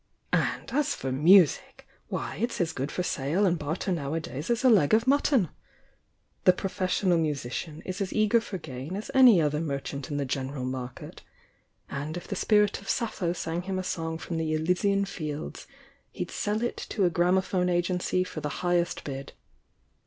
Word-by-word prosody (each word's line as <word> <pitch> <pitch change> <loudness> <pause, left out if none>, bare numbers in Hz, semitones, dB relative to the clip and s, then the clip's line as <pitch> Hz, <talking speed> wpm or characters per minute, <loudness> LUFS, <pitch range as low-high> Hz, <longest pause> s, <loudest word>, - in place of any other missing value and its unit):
And - - 0
as 290 +1 +1
for 135 - -4
music! 165 +4 +4
— - - -40
why, - - -4
it's 235 +4 -2
as 165 -3 0
good 140 +1 -3
for 180 - -2
sale 160 +5 0
and 175 -3 +2
barter 160 +6 -2
nowadays 155 - -3
as 235 +2 +1
a 260 - +6
leg 195 -3 +5
of 225 +1 +2
mutton! 270 - +3 1.0
The 185 - +8
professional 185 -1 0
musician 150 0 -3
is 185 +2 -4
as 195 - -2
eager 215 +2 +3
for 210 -4 -5
gain 135 +2 -7
as 210 - -5
any 255 -8 +8
other 150 -1 +1
merchant 140 -2 -4
in 145 - -2
the 140 - -1
general 130 0 -3
market, 125 -1 -6 0.4
— - - -39 0.3
and 150 +4 -4
if 175 - -8
the 200 - -3
spirit 210 +1 +2
of 195 - -10
Sappho 215 -7 -1
sang 165 0 -3
him 190 +1 -3
a 185 - -2
song 160 -2 -3
from 165 0 -5
the 160 -1 -1
Elysian 190 +5 +1
fields, 155 -5 -6 0.4
he'd 180 -3 -5
sell 210 +2 -1
it 240 - -2
to 200 -4 +1
a 175 - +2
gramophone 180 +1 +2
agency 180 +1 +1
for 165 -4 -7
the 150 - -2 0.2
highest 175 -1 +1
bid. 135 -1 -6
175 Hz, 180 wpm, -28 LUFS, 150-195 Hz, 1.0 s, The